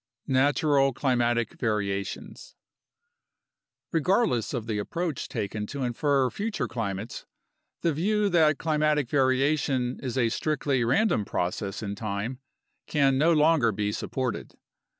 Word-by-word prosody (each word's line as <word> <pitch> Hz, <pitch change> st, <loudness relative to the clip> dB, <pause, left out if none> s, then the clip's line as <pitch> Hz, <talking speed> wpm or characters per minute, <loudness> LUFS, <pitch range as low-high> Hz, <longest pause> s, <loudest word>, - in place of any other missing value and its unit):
Natural 135 Hz, 0 st, +3 dB
Climatic 120 Hz, -3 st, 0 dB
Variations 105 Hz, -, -3 dB, 1.4 s
Regardless 170 Hz, -, +1 dB
of 120 Hz, -5 st, -3 dB
the 110 Hz, -2 st, -2 dB
approach 165 Hz, -, -3 dB
taken 105 Hz, +1 st, -3 dB
to 140 Hz, +2 st, -4 dB
infer 130 Hz, +1 st, +1 dB
future 205 Hz, -, -2 dB
climates, 110 Hz, -1 st, -5 dB, 0.5 s
the 165 Hz, -, +1 dB
view 205 Hz, +7 st, +1 dB
that 155 Hz, -5 st, +4 dB
climatic 150 Hz, -3 st, +1 dB
variation 130 Hz, -1 st, +1 dB
is 130 Hz, -1 st, -4 dB
a 120 Hz, -3 st, +3 dB
strictly 140 Hz, -1 st, 0 dB
random 135 Hz, -, +2 dB
process 95 Hz, +3 st, -3 dB
in 100 Hz, -1 st, -3 dB
time 105 Hz, +4 st, -4 dB, 0.5 s
can 135 Hz, -2 st, +2 dB
no 165 Hz, +4 st, +4 dB
longer 155 Hz, -6 st, +4 dB
be 105 Hz, 0 st, -1 dB
supported. 125 Hz, +2 st, -4 dB
130 Hz, 115 wpm, -27 LUFS, 115-150 Hz, 1.4 s, that